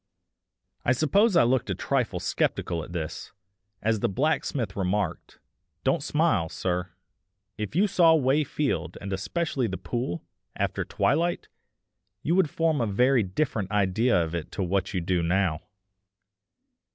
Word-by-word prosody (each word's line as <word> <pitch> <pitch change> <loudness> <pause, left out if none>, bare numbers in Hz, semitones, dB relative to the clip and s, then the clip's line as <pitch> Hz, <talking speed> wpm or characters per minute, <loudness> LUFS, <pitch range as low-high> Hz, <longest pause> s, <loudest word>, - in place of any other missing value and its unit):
I 120 - +3
suppose 195 - +3
I 120 - +6
looked 125 +1 +1
a - - 0
trifle - - -1
sceptical 85 -2 -1
at - - -10
this, 80 -3 -5 0.5
as 110 0 +2
the - - +1
blacksmith 125 -2 -1
remarked: 95 -1 -2 0.5
"Don't - - +2
smile, 80 -1 +1
sir; 90 +1 -2 0.7
if 105 +5 -5
you 195 +4 +4
saw 170 -5 +5
Way 145 0 +3
Field, 145 0 -2
and 100 0 -5
especially 125 - -1
the 95 -2 -4
pool, 120 -8 -4 0.3
after - - -1
twilight, 170 +4 0 0.7
you 165 - +1
would 180 -4 +3
form 160 -3 +1
a 115 - +1
very 125 +5 +3
different 100 0 -1
idea 105 +2 +2
of 80 -1 -1
it 85 -3 -4
to 95 - -1
what 95 +1 0
you 95 - -1
do 90 +1 0
now. 85 -1 +1
110 Hz, 145 wpm, -26 LUFS, 95-145 Hz, 0.7 s, I